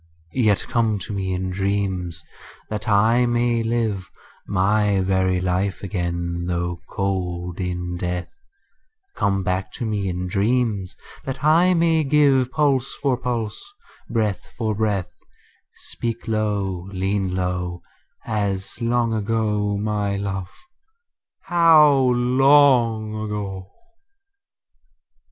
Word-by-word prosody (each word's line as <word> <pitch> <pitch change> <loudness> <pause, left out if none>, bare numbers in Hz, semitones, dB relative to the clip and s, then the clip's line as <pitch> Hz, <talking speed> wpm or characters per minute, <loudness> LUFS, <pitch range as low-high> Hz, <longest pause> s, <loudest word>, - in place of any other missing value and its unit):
Yet 110 -6 +2
come 115 -3 +1
to 100 +2 -6
me 95 -1 -2
in 95 0 -2
dreams, 95 -4 -2 0.5
that 105 +2 -3
I 115 +4 +4
may 120 0 +1
live 115 -4 -1 0.4
My 100 +1 +2
very 95 -1 +1
life 95 +2 -1
again 85 -2 -3
though 85 -1 -2
cold 90 -2 -3
in 90 -1 -3
death: 90 0 -3 0.8
Come 95 -1 0
back 95 +1 -2
to 120 - -4
me 105 -3 -1
in 90 0 -3
dreams, 105 -1 0 0.3
that 135 0 -5
I 170 +4 +5
may 165 -1 +3
give 140 -3 +3
Pulse 135 -3 +1
for 135 -3 0
pulse, 120 -4 -3 0.5
breath 110 -4 -1
for 110 -2 0
breath: 105 -4 -1 0.6
Speak 115 -1 -5
low, 100 -4 -1
lean 95 0 -1
low, 90 -1 -2 0.4
As 100 -2 -2
long 120 0 +1
ago, 105 -1 0
my 105 -1 -1
love, 100 -2 -3 0.9
how 165 -3 +6
long 125 -3 +4
ago! 105 -3 -5
105 Hz, 110 wpm, -22 LUFS, 95-120 Hz, 0.9 s, how